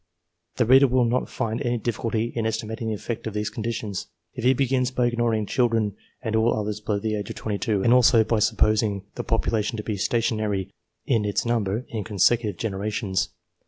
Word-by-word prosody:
The 125 - +2
reader 135 +4 +7
will 125 -1 +3
not 120 +2 0
find 115 0 -2
any 120 -2 0
difficulty 115 0 -2
in 115 -2 0
estimating 110 +1 -3
the 110 - -1
effect 115 +2 -5
of 110 - -5
these 105 0 -2
conditions, 110 -3 -4 0.3
if - - -6
he 130 +2 +4
begins 130 -1 +1
by 125 -1 0
ignoring 120 -3 +1
children 115 -3 +1 0.3
and 110 -2 -1
all 110 +2 +3
others 105 0 -2
below 105 -1 -1
the 110 +1 -2
age 105 -1 -4
of - - -6
22, 105 -1 -1
and 120 - +5
also 125 -2 +6
by 110 0 +1
supposing 105 -2 +2
the - - -4
population 110 0 0
to 105 - -4
be 105 -2 -3
stationary 105 -3 -1 0.3
in 115 -5 +2
its 105 +2 -1
number, 115 -1 0
in 110 -3 -3
con 105 -1 -7
secutive 105 -1 +3
generations. 100 -3 -2
110 Hz, 195 wpm, -24 LUFS, 105-120 Hz, 0.3 s, reader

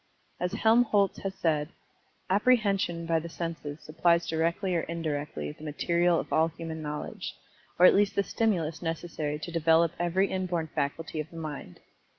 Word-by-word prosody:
As 180 +2 -1
Helmholtz 220 -2 +3
has 195 -1 -4
said, 155 -4 0 0.6
"Apprehension 200 -5 +2
by 165 0 +2
the 170 +1 -7
senses 165 -3 -5
supplies 170 +2 +2
directly 170 +4 0
or 165 - +2
indirectly, 150 - -3
the 150 - -14
material 170 +3 +1
of - - -5
all 160 +1 +4
human 165 -1 -6
knowledge, 150 -1 -5 0.4
or 180 - +7
at - - +8
least 200 0 +3
the 200 - +2
stimulus 175 -8 0
necessary 165 -3 -3
to 155 +3 -7
develop 165 0 +4
every 175 +3 +1
inborn 180 -4 -1
faculty 155 +3 -2
of 155 +1 -4
the 165 - -11
mind." 150 - -7
165 Hz, 160 wpm, -28 LUFS, 155-185 Hz, 0.6 s, at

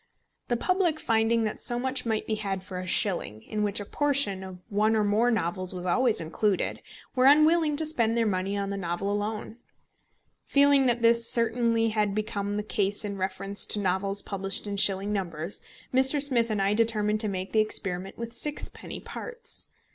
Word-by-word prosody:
The 240 - 0
public 360 +1 +1
finding 225 +1 +2
that 215 - -3
so 240 -1 0
much 260 0 -1
might 220 -1 -1
be 220 - -2
had 195 -3 -2
for 185 -1 -6
a 185 - -6
shilling, 175 - +1
in 215 - -4
which 205 0 +1
a 205 - -5
portion 275 -8 +1
of 185 -1 -8
one 215 +1 +1
or 215 - +2
more 210 +4 +2
novels 185 -4 -1
was 180 0 -6
always 235 +6 +3
included, 185 +5 -1 0.3
were 255 0 +4
unwilling 305 +1 +5
to 315 +2 -2
spend 235 -7 +2
their 230 - +2
money 195 0 -1
on 200 0 -2
the 200 - -3
novel 180 +2 -2
alone. 210 +2 -3 0.9
Feeling 280 -1 +4
that 240 -1 0
this 230 0 +4
certainly 230 -1 +1
had 210 -2 0
become 205 -1 -2
the 210 - -2
case 205 0 0
in 200 -1 -4
reference 195 +1 -3
to 210 - +1
novels 195 +1 -1
published 195 0 -3
in 205 -1 -3
shilling 195 +1 +3
numbers, 175 -2 -4 0.3
Mr. 265 +3 +4
Smith 250 -5 +3
and 210 -2 0
I 200 +1 +2
determined 215 -1 +1
to 215 - +2
make 190 -1 -4
the 220 - +2
experiment 195 -3 -2
with 235 0 -6
sixpenny 295 +4 -4
parts. 470 -1 -8
215 Hz, 185 wpm, -27 LUFS, 195-235 Hz, 0.9 s, unwilling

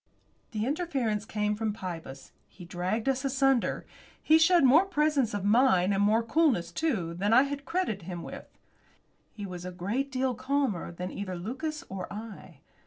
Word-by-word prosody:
The 215 -2 -2
interference 265 - -1
came 210 -1 -1
from 220 0 -2
Pybus. 165 -9 -7 0.2
He 180 - -13
dragged 185 +7 -2
us 265 0 +1
asunder. 270 -2 +1 0.3
He 315 +1 +4
showed 345 0 +5
more 290 +8 +6
presence 300 - +1
of 200 -1 -3
mind, 205 -4 +4
and 195 - +1
more 215 +3 +3
coolness, 230 - +2
too, 195 - -1
than 200 +5 0
I 255 +3 +7
had 280 0 -5
credited 225 - -2
him 175 -2 -5
with. - - -8 0.8
He 205 -2 -7
was 180 -2 -7
a 180 - -5
great 210 +10 -2
deal 260 -1 0
calmer 260 -8 -1
than 180 +2 -6
either 185 -2 -5
Lucas 270 - -4
or 190 -1 -6
I. 205 -8 -9
220 Hz, 170 wpm, -29 LUFS, 185-275 Hz, 0.8 s, I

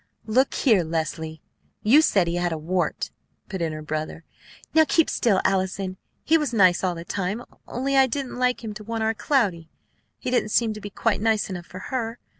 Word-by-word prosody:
"Look 255 +5 +2
here! 220 -10 +4
Leslie, 160 -1 -3 0.4
you 260 +9 +7
said 195 - +3
he 170 - -2
had 175 0 0
a 160 - -2
wart!" 175 +4 -1 0.4
put 190 -3 -4
in 165 -1 0
her 155 0 -6
brother. 155 +1 -4 0.5
"Now 320 - +7
keep 325 +1 +2
still, 205 -5 +2
Allison. 190 0 0 0.3
He 325 +1 +4
was 295 -5 -2
nice 185 -4 +5
all 180 -2 0
the 170 0 -8
time; 200 +6 -2 0.2
only 270 +3 -1
I 265 -1 +6
didn't 260 -1 -4
like 250 -1 +1
him 215 -2 -4
to 215 - -9
want 225 +1 -3
our 220 0 +2
Cloudy. 200 - 0 0.5
He 250 - -4
didn't 245 -4 +1
seem 225 0 +2
to 215 - -9
be 205 - -6
quite 205 0 0
nice 220 -2 +1
enough 175 -3 -6
for 185 - -9
her. 230 -2 -2
205 Hz, 205 wpm, -24 LUFS, 175-245 Hz, 0.5 s, you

